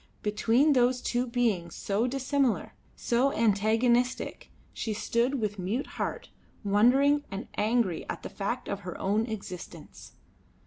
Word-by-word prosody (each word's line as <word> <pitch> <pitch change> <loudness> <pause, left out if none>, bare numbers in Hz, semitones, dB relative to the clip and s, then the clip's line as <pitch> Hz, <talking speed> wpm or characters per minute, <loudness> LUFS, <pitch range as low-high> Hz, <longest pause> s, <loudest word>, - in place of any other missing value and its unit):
Between 230 +8 +3
those 250 -1 +3
two 245 0 -1
beings 225 -9 0
so 210 +4 0
dissimilar, 270 -1 0 0.2
so 250 +4 +1
antagonistic, 230 +3 +1 0.2
she 220 -2 -3
stood 240 +5 0
with 205 -2 -2
mute 205 +9 -2
heart - - -5 0.3
wondering 260 +8 +4
and 195 +1 -6
angry 215 -5 0
at - - -5
the - - -5
fact 210 +5 -3
of 200 - -3
her 180 -3 -7
own 210 +4 +1
existence. 180 -7 -8
230 Hz, 130 wpm, -28 LUFS, 205-250 Hz, 0.3 s, wondering